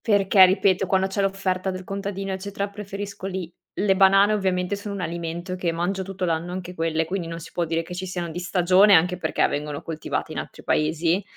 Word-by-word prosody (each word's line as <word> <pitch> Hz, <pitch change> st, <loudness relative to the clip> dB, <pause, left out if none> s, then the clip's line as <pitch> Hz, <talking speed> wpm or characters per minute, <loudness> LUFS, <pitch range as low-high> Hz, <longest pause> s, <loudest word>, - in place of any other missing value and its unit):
Perché 195 Hz, -2 st, +6 dB
ripeto 190 Hz, 0 st, +2 dB
quando 190 Hz, 0 st, +2 dB
c'è 195 Hz, +1 st, -1 dB
l'offerta 195 Hz, -1 st, -1 dB
del 185 Hz, 0 st, -5 dB
contadino 195 Hz, 0 st, -4 dB
eccetera 200 Hz, +1 st, -4 dB
preferisco 200 Hz, -1 st, -6 dB
lì. 185 Hz, -3 st, -5 dB, 0.2 s
Le 195 Hz, -1 st, +2 dB
banane 195 Hz, +2 st, +5 dB
ovviamente 190 Hz, -1 st, 0 dB
sono 205 Hz, 0 st, -6 dB
un 195 Hz, -, -4 dB
alimento 170 Hz, +1 st, -4 dB
che 180 Hz, -2 st, -1 dB
mangio 175 Hz, +4 st, -1 dB
tutto 190 Hz, 0 st, -4 dB
l'anno 165 Hz, +1 st, -1 dB
anche 180 Hz, 0 st, -6 dB
quelle, 160 Hz, -1 st, 0 dB
quindi 180 Hz, 0 st, -3 dB
non 165 Hz, 0 st, -5 dB
si 165 Hz, -, -11 dB
può 175 Hz, -, 0 dB
dire 165 Hz, 0 st, -1 dB
che 180 Hz, -, -9 dB
ci 185 Hz, +1 st, -5 dB
siano 175 Hz, -2 st, -4 dB
di 170 Hz, -, -5 dB
stagione, 185 Hz, +3 st, +5 dB
anche 180 Hz, +2 st, +3 dB
perché 160 Hz, -2 st, +1 dB
vengono 145 Hz, 0 st, -4 dB
coltivate 160 Hz, -1 st, -4 dB
in -, -, -3 dB
altri -, -, -9 dB
paesi. 165 Hz, +5 st, +1 dB
185 Hz, 205 wpm, -24 LUFS, 170-195 Hz, 0.2 s, Perché